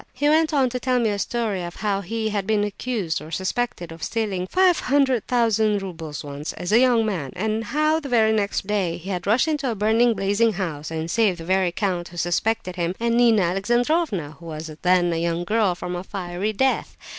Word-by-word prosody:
He 290 +3 0
went 310 +1 +3
on 270 -4 +2
to 250 - -2
tell 255 0 +1
me 225 -3 +1
a 200 - -2
story 215 -3 -1
of 175 0 -7
how 200 -2 -1
he 220 +3 -2
had 200 -2 -2
been 215 -1 +2
accused, 205 -6 -2
or 155 - -10
suspected, 190 0 -2
of 165 0 -10
stealing 200 -5 -2
five 370 - +3
hundred 265 -4 +1
thousand 220 -4 +2
roubles 165 -5 -6
once, 145 +1 -6
as 180 - -5
a 225 - +6
young 245 -3 +4
man; 170 -11 -3
and 220 +3 -1
how, 305 +6 +1
the 285 -3 -7
very 220 -3 +4
next 205 -3 0
day, 195 -4 -1
he 185 +4 -7
had 180 0 -4
rushed 235 +9 +3
into 295 -4 -1
a 230 - -2
burning, 225 +3 +3
blazing 205 +3 +2
house 160 -7 -4
and 160 +1 -4
saved 215 -6 +2
the 165 - -8
very 185 0 +2
count 175 -2 -2
who 175 - -12
suspected 185 +3 -1
him, 175 +1 -1
and 235 0 +1
Nina 230 -4 +4
Alexandrovna 205 - 0
(who 170 - -11
was 155 0 -6
then 180 -1 +3
a - - -1
young 170 +1 -1
girl), 210 -1 +1
from 180 0 -5
a 175 - -4
fiery 190 +1 -3
death. 265 +5 0
205 Hz, 215 wpm, -23 LUFS, 175-235 Hz, -, a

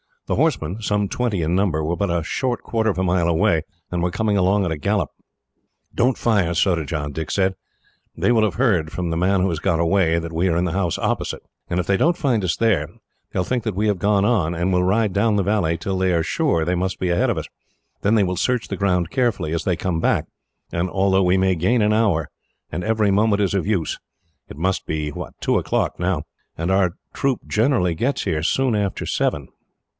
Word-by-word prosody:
The - - -1
horsemen, 90 +8 0
some 105 -2 0
twenty 115 -7 -1
in 85 +3 0
number, 90 -5 +1
were 85 +3 -1
but 100 -2 0
a 85 -1 0
short 125 - -2
quarter 110 -1 0
of 95 - -1
a 95 - 0
mile 90 -2 +2
away, 80 -1 +2 0.3
and 90 -1 -1
were 90 - +1
coming 105 +2 0
along 100 +2 +3
at 90 - -1
a 80 - -2
gallop. 100 -1 0 0.8
"Don't 125 +1 +2
fire, 100 -7 +1
Surajah," 80 -4 0
Dick 80 +2 -5
said. 95 -1 +1 0.6
"They - - +1
will 115 -2 +4
have 105 - -2
heard, 100 -11 +1
from 90 -2 -2
the 80 - -1
man 95 +2 +2
who 95 - +2
has 80 -3 -2
got 80 +1 +1
away, 85 -1 +2
that 85 0 -6
we 85 +3 0
are 85 - +1
in 85 - +1
the 90 - -1
house 90 -3 -1
opposite, - - -2 0.3
and 90 +1 0
if - - -7
they 100 +1 +2
don't 170 - +2
find 120 -9 +1
us 85 - 0
there, 115 -4 +1 0.4
they - - -2
will - - +2
think 125 +5 -2
that 110 -4 -2
we 105 +3 +1
have 100 -3 0
gone 100 0 +2
on, 90 -7 +1
and 85 +3 0
will 90 0 +2
ride 105 +2 +2
down 105 +3 +2
the 100 - +2
valley 90 -5 +1
till 95 +3 -3
they 95 -1 +1
are 85 -1 +2
sure 80 +1 +1
they 90 +3 0
must 95 +2 -2
be 90 - -1
ahead 85 - +2
of - - 0
us. - - -3 0.6
Then 105 +3 +2
they 105 - +4
will 90 -1 -1
search 125 +3 0
the - - -3
ground 90 -4 0
carefully, 120 - 0
as 85 - -2
they 90 - +1
come 85 -1 -2
back, - - +1 0.5
and 85 +2 -1
altogether 95 0 +2
we 90 +1 +3
may 95 0 +2
gain 95 +9 +2
an 105 +1 +3
hour; 100 -8 +1 0.4
and 90 - -3
every 110 -2 +2
moment 105 +1 +2
is 100 -2 +1
of 100 -1 -1
use. 95 -7 -1 0.5
It - - -11
must 95 +4 -1
be 75 -1 -2 0.3
two - - +2
o'clock - - -1
now, 90 -4 0 0.3
and 85 +3 -1
our 95 -3 +2 0.2
troop 135 -3 0
generally 110 -6 +2
gets 125 - -1
here 80 -6 -1
soon 125 +8 +1
after 100 -2 -2
seven." 70 -3 -1
95 Hz, 230 wpm, -21 LUFS, 85-105 Hz, 0.8 s, will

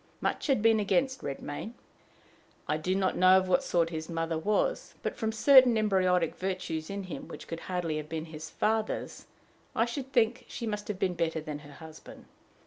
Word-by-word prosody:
Much - - -1
had 265 -7 +2
been 225 -1 +5
against 260 +6 +1
Redmain. 145 - -5 0.9
I 150 - +1
do 180 +4 -1
not 190 -1 +1
know 185 +1 +6
of 185 0 +1
what 185 - +3
sort 170 -1 +1
his 160 0 -5
mother 165 0 -2
was, 210 - 0
but - - -2
from 220 -1 -1
certain 250 +1 +6
embryonic 185 -5 +2
virtues 180 -4 -3
in 200 0 -4
him, 185 - -7
which - - -10
could 165 - -5
hardly 175 -4 -2
have 150 0 -6
been 160 -1 -4
his 155 -1 -8
father's, 220 0 -2 0.5
I 230 - +3
should 260 +2 -5
think 235 0 +2
she 235 - -6
must 210 -2 -3
have 210 - -3
been 190 -2 0
better 165 -1 -1
than 150 -1 -6
her 145 -1 -13
husband. 160 +1 -12
185 Hz, 190 wpm, -29 LUFS, 160-220 Hz, 0.9 s, know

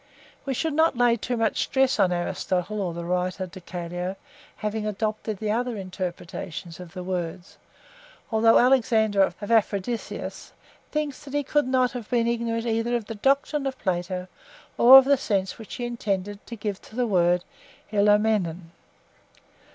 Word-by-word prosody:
(6) - - -34
We 270 - 0
should 320 +4 -1
not 320 -3 +3
lay 245 -1 +4
too 240 +2 -3
much 225 -1 +1
stress 265 -1 +2
on 180 - +4
Aristotle 180 +3 -2
or 180 -3 -1
the 170 0 -6
writer 180 +1 -1
De 185 +1 -11
Caelo 175 +1 -5 0.4
having 215 0 -3
adopted 215 0 -2
the 210 +1 -2
other 240 +1 -1
interpretation 180 -2 -6
of 180 -1 -10
the 180 - -5
words, 180 0 -4 0.7
although 225 +1 +5
Alexander 225 -5 +3
of 190 - +2
Aphrodisias 220 +1 -1 0.4
thinks 300 -2 -3
that 285 -1 -7
he 290 - +1
could 295 0 +1
not 255 -1 +2
have 245 -4 -7
been 235 -2 +2
ignorant 230 -1 -1
either 230 +1 0
of 235 -3 -2
the 225 - -6
doctrine 275 +5 +1
of 265 -1 -4
Plato 180 -1 -2 0.5
or 255 +3 +10
of 270 - +7
the 280 0 +4
sense 195 -5 -1
which 220 - -8
he 245 - -4
intended 205 -4 -3
to 235 - -6
give 205 -2 -4
to 220 - -15
the 250 0 +1
word 180 -4 +2 0.5
(Greek). 210 -4 +3
215 Hz, 165 wpm, -25 LUFS, 185-240 Hz, 0.7 s, or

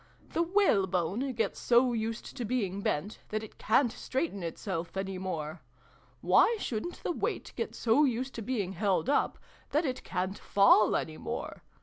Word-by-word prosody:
The - - +2
whalebone 220 - +2
gets 225 -1 -1
so 245 +1 +4
used 225 0 -3
to 250 - -3
being 205 -5 -1
bent, 200 +4 -2
that 215 0 -2
it 220 - -12
ca'n't 235 +2 +3
straighten 260 - -3
itself 170 +1 -4
any 195 -1 -3
more. 160 -3 -4 0.6
Why 470 - +5
shouldn't 260 - -4
the - - 0
weight - - -3
get - - -3
so 240 +6 +3
used 260 -1 0
to 230 - -5
being 205 -5 -2
held 200 +6 +1
up, 290 - +1 0.3
that 305 +3 +1
it 255 -2 -3
ca'n't 185 +2 -3
fall 200 +1 +5
any 155 -1 -2
more - - -5
220 Hz, 160 wpm, -30 LUFS, 190-255 Hz, 0.6 s, Why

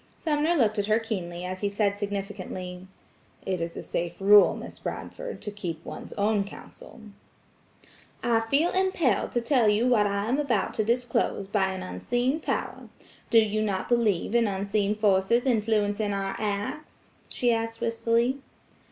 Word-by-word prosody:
Sumner 310 +1 +1
looked 220 -7 +2
at 200 - 0
her 215 0 +4
keenly 180 -6 -4
as 185 0 -5
he 205 - +1
said 200 0 +1
significantly: 195 -3 -5 0.6
"It 185 -2 -1
is 165 0 -4
a - - -5
safe 170 0 -3
rule, 205 +1 +7
Miss - - -9
Bradford, - - -6
to 210 - -4
keep 185 -6 -6
one's - - -8
own 205 0 +1
counsel." 200 +3 -12 1.2
"I 230 -1 +3
feel 280 +9 +2
impelled 370 - +1
to 240 - +1
tell 235 -3 +3
you 215 +4 +2
what 220 -5 +4
I 200 0 -1
am 255 +6 0
about 240 -9 0
to 215 - 0
disclose, 235 -3 0
by 195 -1 +1
an 190 -1 -4
unseen 245 - -1
power. - - -3 0.4
Do 230 - +4
you 215 -1 +3
not 200 -3 -1
believe 225 -5 +1
in 235 -1 +3
unseen 200 +1 0
forces 210 +3 +2
influencing 210 -3 +1
our 195 0 -2
acts?" 210 +8 -4 0.2
she 240 -1 +2
asked 225 0 -3
wistfully. 230 +3 +1
215 Hz, 160 wpm, -27 LUFS, 200-235 Hz, 1.2 s, rule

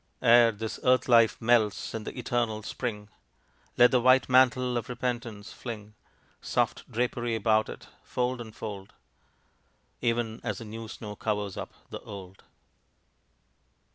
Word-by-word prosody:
Ere 120 -1 +7
this 110 +1 -5
earth 130 0 +3
life 115 -4 +5
melts 115 -3 +2
in 110 -1 -5
the - - -7
eternal 120 -3 -1
Spring 105 -2 -4 0.7
Let 125 0 +7
the 125 -2 +3
white 130 +2 +5
mantle 130 -1 +4
of 120 -1 -3
repentance, 120 -4 -4
fling 110 -3 -8 0.5
Soft - - -1
drapery 120 0 -1
about 110 0 +2
it, - - -9 0.2
fold 125 0 -2
on 110 -2 -8
fold, 100 -3 -8 1.1
Even 115 -2 -1
as 105 -5 -2
the 115 - -8
new 110 +1 -7
snow 105 -2 -8
covers 105 -2 -2
up - - -7 0.2
the - - -5
old. 95 -2 -10
115 Hz, 140 wpm, -28 LUFS, 105-125 Hz, 1.1 s, Ere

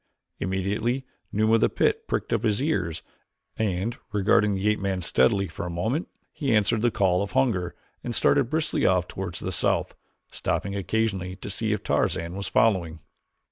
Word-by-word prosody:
Immediately 105 +8 -1 0.3
Numa 110 +2 +2
of 115 - +4
the - - +4
pit - - 0
pricked - - -2
up - - +1
his 105 -2 +1
ears 95 - -1 0.5
and, 105 +2 -1
regarding 105 0 +3
the 95 +2 -1
ape 105 0 +2
man 95 -1 -1
steadily 85 +6 +3
for - - -7
a 90 - -3
moment, 110 - -1 0.2
he 135 -6 0
answered 105 +1 +2
the 120 - +4
call 95 -4 +2
of 100 -2 -4
hunger 95 -10 +1 0.3
and 120 -1 -3
started 135 0 +3
briskly 155 0 0
off 90 -1 +3
toward 90 -3 -5
the - - -4
south, - - 0 0.4
stopping 100 0 -2
occasionally 95 -2 -1
to 100 - -7
see 110 +2 -1
if 105 - -1
Tarzan 85 +2 0
was 100 0 -4
following. 95 -6 +2
100 Hz, 175 wpm, -26 LUFS, 95-115 Hz, 0.5 s, of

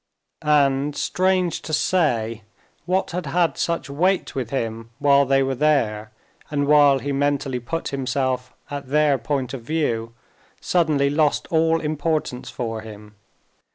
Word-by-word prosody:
And, 145 -1 +2
strange 185 0 0
to 155 - -7
say, 115 -11 +1 0.5
what 185 +2 0
had 175 -2 -4
had 170 +3 +1
such 170 -2 -2
weight 180 +7 0
with 130 -4 -3
him, 115 -3 -3
while 140 -1 +4
they 135 0 +3
were 135 0 -1
there 120 -7 +1 0.4
and 145 -1 0
while 145 -1 +5
he 140 +2 -4
mentally 140 -2 0
put 165 +8 -4
himself 130 -1 -2 0.2
at 140 -2 -5
their 145 -1 +2
point 130 +1 -2
of 135 - -5
view, 115 -5 -2 0.4
suddenly 150 -5 +1
lost 150 0 +1
all 165 0 +3
importance 150 -4 -2
for 115 -3 -4
him. 105 -1 -11
140 Hz, 140 wpm, -22 LUFS, 125-155 Hz, 0.5 s, while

